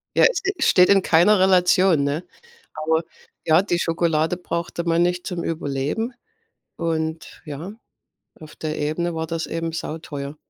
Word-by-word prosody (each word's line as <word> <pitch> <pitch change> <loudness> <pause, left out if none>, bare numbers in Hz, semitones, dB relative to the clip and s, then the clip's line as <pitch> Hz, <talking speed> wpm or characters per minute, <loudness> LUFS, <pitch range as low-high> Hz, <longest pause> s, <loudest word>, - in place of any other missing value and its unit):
Ja, - - +6
es, - - -2
äh, 390 - 0
steht 180 -1 +5
in 195 -1 +5
keiner 180 +5 +4
Relation, 185 -3 +4
ne? 145 +5 -2 0.5
Aber 160 +1 0 0.4
ja, 160 +2 +5
die 190 -3 -1
Schokolade 165 0 0
brauchte 170 -1 -4
man 170 0 +1
nicht 180 0 -1
zum 175 -2 -4
Überleben. 155 - -2 0.6
Und 160 -1 -3
ja, 155 +6 -7 0.7
auf 155 -1 -12
der 155 -1 -4
Ebene 160 +3 -2
war 160 0 -3
das 165 0 -3
eben 165 0 -3
sauteuer. 155 -3 -6
165 Hz, 150 wpm, -22 LUFS, 155-180 Hz, 0.7 s, Ja